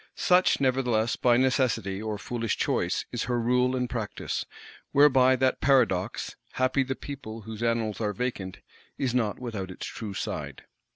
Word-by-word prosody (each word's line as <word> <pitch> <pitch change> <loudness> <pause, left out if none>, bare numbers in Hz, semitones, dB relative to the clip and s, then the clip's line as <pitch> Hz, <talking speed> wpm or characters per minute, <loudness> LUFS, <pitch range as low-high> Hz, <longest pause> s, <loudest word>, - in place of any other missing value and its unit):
Such, 180 +1 +3
nevertheless, 125 -4 +1
by 120 -1 +3
necessity 115 -6 +1
or 110 -1 -3
foolish 115 +1 -2
choice, - - 0
is - - -2
her 120 0 0
rule 125 +2 +2
and 125 -1 0
practice; 115 -4 -4 0.5
whereby 130 -2 +6
that 130 0 +1
paradox, 115 -7 +2 0.2
"Happy 130 +1 +2
the 135 0 -2
people 130 -7 -8
whose 110 +1 -8
annals 115 -3 0
are 105 -1 0
vacant," 105 -4 -4 0.4
is 130 -3 -1
not 115 -5 0
without 110 -7 -5
its 95 - -7
true 105 -3 -6
side. - - -5
120 Hz, 155 wpm, -27 LUFS, 110-130 Hz, 0.5 s, whereby